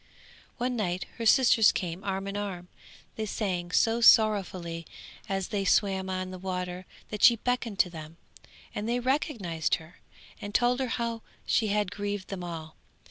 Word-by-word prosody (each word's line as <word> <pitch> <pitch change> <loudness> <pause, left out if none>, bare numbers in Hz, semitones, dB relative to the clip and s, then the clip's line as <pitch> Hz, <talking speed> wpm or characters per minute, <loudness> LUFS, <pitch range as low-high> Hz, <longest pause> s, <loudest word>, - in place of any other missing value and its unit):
One 245 +1 -1
night 185 -5 -2
her 230 - -1
sisters 235 -3 +6
came 180 0 -4
arm 195 -1 -2
in 200 0 -5
arm; 190 -4 -5 0.5
they 220 -1 -2
sang 185 -4 -2
so 225 +5 +2
sorrowfully 185 -7 +4 0.4
as 195 -1 -2
they 205 -3 -1
swam 190 -1 +2
on 185 0 -3
the 185 - -8
water 180 -1 -4 0.2
that 210 -1 -5
she 235 - +8
beckoned 235 -2 -2
to 180 - -1
them, 160 0 -9 0.6
and 210 +2 -3
they 245 +1 +1
recognised 240 - 0
her, 160 +2 -13 0.4
and 205 0 -7
told 245 +1 +3
her 260 - 0
how 230 -1 -2 0.2
she 220 - +2
had 205 -2 0
grieved 205 -1 -4
them 190 -3 -5
all. 160 -2 -7
200 Hz, 165 wpm, -28 LUFS, 180-225 Hz, 0.6 s, she